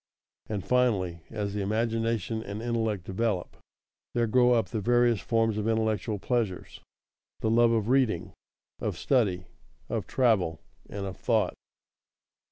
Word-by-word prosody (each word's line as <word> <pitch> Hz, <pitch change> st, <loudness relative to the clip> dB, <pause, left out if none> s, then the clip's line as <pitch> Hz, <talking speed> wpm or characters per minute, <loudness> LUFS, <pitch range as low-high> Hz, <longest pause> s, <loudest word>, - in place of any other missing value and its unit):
And 105 Hz, -3 st, -3 dB
finally, 100 Hz, -10 st, +1 dB
as 105 Hz, -3 st, -3 dB
the 105 Hz, -, -2 dB
imagination 115 Hz, +1 st, -1 dB
and 100 Hz, -1 st, -6 dB
intellect 110 Hz, -4 st, -1 dB
develop, 95 Hz, -1 st, -2 dB, 0.6 s
there 120 Hz, -1 st, +3 dB
grow 125 Hz, +2 st, +4 dB
up 115 Hz, -5 st, +1 dB
the 110 Hz, -2 st, -2 dB
various 120 Hz, 0 st, +3 dB
forms 115 Hz, -2 st, +1 dB
of 105 Hz, -, -2 dB
intellectual 110 Hz, -1 st, 0 dB
pleasures 110 Hz, -3 st, -2 dB, 0.6 s
the 110 Hz, -, +1 dB
love 115 Hz, 0 st, +5 dB
of 110 Hz, -2 st, +1 dB
reading, 130 Hz, -3 st, +1 dB, 0.5 s
of -, -, -3 dB
study, 100 Hz, -9 st, +1 dB, 0.4 s
of -, -, -2 dB
travel, 100 Hz, -, +2 dB, 0.3 s
and 100 Hz, -1 st, -5 dB
of 95 Hz, -2 st, -6 dB
thought. -, -, +1 dB
110 Hz, 135 wpm, -28 LUFS, 100-115 Hz, 0.6 s, love